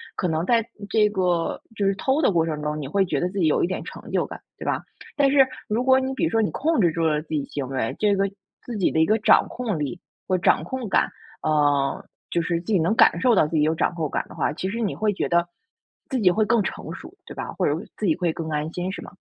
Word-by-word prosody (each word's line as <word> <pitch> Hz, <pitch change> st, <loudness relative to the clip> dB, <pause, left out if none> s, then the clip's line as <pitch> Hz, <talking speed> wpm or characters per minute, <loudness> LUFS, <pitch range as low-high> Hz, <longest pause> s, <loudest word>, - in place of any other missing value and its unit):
可 180 Hz, -, -1 dB
能 160 Hz, +2 st, 0 dB
在 230 Hz, 0 st, +2 dB, 0.2 s
这 210 Hz, -1 st, +3 dB
个 180 Hz, -4 st, 0 dB
就 200 Hz, -1 st, -1 dB
是 195 Hz, -, +3 dB
偷 270 Hz, +8 st, +1 dB
的 240 Hz, -, +4 dB
过 165 Hz, -2 st, +2 dB
程 155 Hz, -2 st, -3 dB
中， 150 Hz, 0 st, -2 dB
你 140 Hz, -, -5 dB
会 195 Hz, +6 st, +2 dB
觉 145 Hz, -5 st, -1 dB
得 175 Hz, -, 0 dB
自 200 Hz, -, -8 dB
己 170 Hz, -, +3 dB
有 155 Hz, -, +2 dB
一 -, -, +2 dB
点 185 Hz, -, -4 dB
成 -, -, -10 dB
就 -, -, +1 dB
感， -, -, -9 dB, 0.2 s
对 -, -, -8 dB
吧？ -, -, 0 dB, 0.4 s
但 280 Hz, -1 st, +4 dB
是 270 Hz, -1 st, +6 dB, 0.2 s
如 220 Hz, +4 st, 0 dB
果 260 Hz, 0 st, +5 dB
你 265 Hz, 0 st, -2 dB
比 -, -, -2 dB
如 -, -, +3 dB
说 225 Hz, 0 st, +2 dB
你 210 Hz, -, +1 dB
控 315 Hz, +1 st, 0 dB
制 175 Hz, -, +4 dB
住 165 Hz, -1 st, 0 dB
了 150 Hz, -1 st, +1 dB
自 155 Hz, -, -18 dB
己 150 Hz, -3 st, -1 dB
行 140 Hz, -3 st, -5 dB
为 130 Hz, -4 st, -2 dB
这 205 Hz, -1 st, +3 dB
个 195 Hz, -, +2 dB, 0.4 s
自 235 Hz, -3 st, -5 dB
己 185 Hz, -, +2 dB
的 160 Hz, -, +2 dB
一 -, -, +5 dB
个 215 Hz, +4 st, +3 dB
掌 210 Hz, -, +5 dB
控 230 Hz, -8 st, -3 dB
力 150 Hz, +4 st, -3 dB, 0.3 s
或 185 Hz, -, +2 dB
掌 -, -, +3 dB
控 260 Hz, -4 st, -4 dB
感 -, -, +2 dB, 0.3 s
呃， 145 Hz, +3 st, +1 dB, 0.2 s
就 170 Hz, -, 0 dB
是 170 Hz, 0 st, -1 dB
自 170 Hz, -, -22 dB
己 -, -, +5 dB
能 170 Hz, +7 st, +2 dB
感 -, -, +5 dB
受 250 Hz, -2 st, +4 dB
到 155 Hz, -, +4 dB
自 160 Hz, -, -4 dB
己 150 Hz, -, +3 dB
有 160 Hz, +1 st, +2 dB
掌 165 Hz, -, 0 dB
控 155 Hz, -4 st, -2 dB
感 -, -, -2 dB
的 -, -, -13 dB
话， -, -, 0 dB
其 185 Hz, +5 st, -3 dB
实 230 Hz, +4 st, -4 dB
你 210 Hz, -, -1 dB
会 215 Hz, -1 st, +1 dB
觉 -, -, -1 dB
得 170 Hz, -1 st, +2 dB, 0.6 s
自 260 Hz, -, -1 dB
己 195 Hz, -5 st, +5 dB
会 215 Hz, +3 st, +2 dB
更 230 Hz, 0 st, +3 dB
成 -, -, -5 dB
熟， -, -, -10 dB
对 -, -, -9 dB
吧？ -, -, -5 dB
或 -, -, -1 dB
者 145 Hz, -, +2 dB, 0.2 s
自 215 Hz, -, -3 dB
己 160 Hz, -, +3 dB
会 175 Hz, -2 st, 0 dB
更 165 Hz, -, -5 dB
安 150 Hz, +1 st, -2 dB
心 180 Hz, +1 st, -3 dB
是 -, -, -6 dB
吗？ -, -, -10 dB
180 Hz, 305 characters per minute, -24 LUFS, 160-215 Hz, 0.6 s, 是